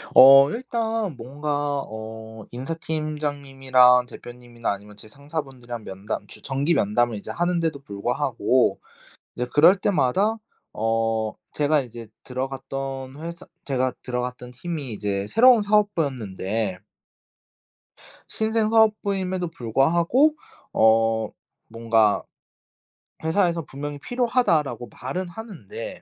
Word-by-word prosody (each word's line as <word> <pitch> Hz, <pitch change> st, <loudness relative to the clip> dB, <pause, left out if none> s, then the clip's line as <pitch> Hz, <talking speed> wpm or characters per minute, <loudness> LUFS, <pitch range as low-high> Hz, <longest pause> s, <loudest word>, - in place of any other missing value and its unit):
어 135 Hz, +1 st, +10 dB
일단 225 Hz, -, -2 dB
뭔가 145 Hz, +3 st, -2 dB
어 110 Hz, 0 st, -8 dB
인사팀장님이랑 135 Hz, -3 st, +1 dB
대표님이나 120 Hz, -2 st, -6 dB
아니면 100 Hz, +1 st, -8 dB
제 110 Hz, -, -10 dB
상사분들이랑 135 Hz, -4 st, -7 dB
면담 95 Hz, +3 st, -5 dB
규 -, -, -11 dB
정기 140 Hz, +5 st, 0 dB
면담을 120 Hz, -1 st, +1 dB
이제 -, -, -9 dB
하는데도 170 Hz, -4 st, 0 dB
불구하고 125 Hz, +1 st, 0 dB, 0.6 s
이제 125 Hz, -, -2 dB
그럴 165 Hz, +6 st, +7 dB
때마다 195 Hz, -, +1 dB, 0.4 s
어 115 Hz, 0 st, 0 dB, 0.2 s
제가 150 Hz, 0 st, +2 dB
이제 115 Hz, -2 st, -10 dB, 0.2 s
들어갔던 135 Hz, +1 st, -5 dB
회사 170 Hz, +1 st, -7 dB, 0.2 s
제가 130 Hz, -2 st, 0 dB
들어갔던 125 Hz, 0 st, -4 dB
팀이 145 Hz, -1 st, -5 dB
이제 100 Hz, -1 st, -2 dB
새로운 240 Hz, -, +6 dB
사업부였는데 125 Hz, -, 0 dB, 1.5 s
신생 220 Hz, 0 st, 0 dB
사업부임에도 200 Hz, -5 st, +2 dB
불구하고 170 Hz, -, +2 dB, 0.4 s
어 110 Hz, 0 st, +3 dB, 0.4 s
뭔가 115 Hz, -2 st, +2 dB, 1.0 s
회사에서 170 Hz, -1 st, +1 dB
"분명히 145 Hz, +1 st, -6 dB
필요하다."라고 165 Hz, -, 0 dB
말은 175 Hz, +9 st, -3 dB
하는데 225 Hz, -, -8 dB
135 Hz, 270 characters per minute, -24 LUFS, 115-170 Hz, 1.5 s, 어